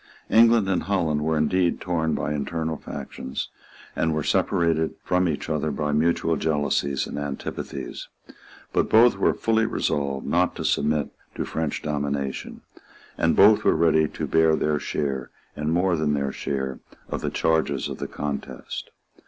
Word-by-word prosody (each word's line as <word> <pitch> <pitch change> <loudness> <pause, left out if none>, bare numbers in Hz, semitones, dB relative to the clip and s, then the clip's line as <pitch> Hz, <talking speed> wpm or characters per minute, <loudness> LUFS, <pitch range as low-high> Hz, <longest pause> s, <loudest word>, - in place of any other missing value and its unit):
England 115 -2 +6
and 95 -2 +1
Holland 85 -5 0
were 80 +1 +1
indeed 85 +3 +1
torn 80 -3 0
by 75 - -2
internal 80 +2 -2
factions, 65 -3 -6 0.5
and 80 -1 +1
were 75 - -1
separated 80 0 +1
from 90 -1 +2
each 75 - -3
other 75 0 -1
by 75 +1 -2
mutual 80 +2 +2
jealousies 75 -3 0
and - - -5
antipathies; 70 -2 -5 0.7
but - - +1
both 115 +2 +6
were - - +3
fully 110 0 +1
resolved 70 -9 -1
not 90 +1 +1
to - - -4
submit 75 0 +1 0.2
to - - -2
French 80 -2 -3
domination; 70 -2 -3 0.5
and 80 - +2
both 105 +2 +6
were - - +4
ready 80 -1 +3
to - - -5
bear 80 -1 +4
their 75 -1 0
share, 70 -4 -2 0.3
and 75 +1 -2
more 90 +1 +2
than 75 -2 +1
their 70 -1 -1
share, 65 -1 -3 0.3
of - - -3
the - - -1
charges 80 -4 +1
of - - -6
the - - -3
contest. 75 -1 -5
80 Hz, 155 wpm, -24 LUFS, 75-85 Hz, 0.7 s, England